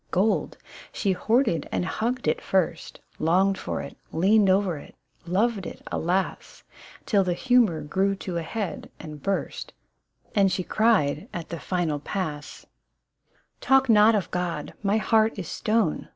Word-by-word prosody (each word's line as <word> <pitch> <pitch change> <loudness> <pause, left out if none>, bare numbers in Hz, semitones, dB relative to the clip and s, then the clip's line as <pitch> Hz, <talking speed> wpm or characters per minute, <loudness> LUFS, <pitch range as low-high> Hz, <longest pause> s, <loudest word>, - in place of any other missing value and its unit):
Gold! 200 +4 0 0.3
She 200 - 0
hoarded 220 0 +1
and - - -1
hugged 240 +6 -2
it - - +1
first, 175 -3 -1 0.2
Longed 185 +5 +3
tor - - -4
it, - - -9 0.2
leaned 195 +4 +4
o'er 190 -2 +2
it, - - -13 0.3
loved 200 +1 0
it - - -10
alas 180 +3 -2 0.2
— - - -20
Till 200 -3 +3
the 180 -2 -1
humour 235 -9 +3
grew 190 +6 0
to 185 -2 -5
a - - -1
head 205 +4 -5
and 150 -2 -9
burst, 195 +4 -3 0.6
And 195 -2 +3
she 185 0 -1
cried, 170 -10 +1
at 170 -2 -6
the 170 - -5
final 165 -2 -1
pass, 150 -3 -5 0.3
— - - -52
" - - -40
Talk 270 -1 +3
not 215 0 +6
of 195 -5 -2
God, 175 -4 -3
my 205 +1 +2
heart 220 +1 +2
is 185 -5 -5
stone 215 -4 0
190 Hz, 160 wpm, -25 LUFS, 170-215 Hz, 0.6 s, not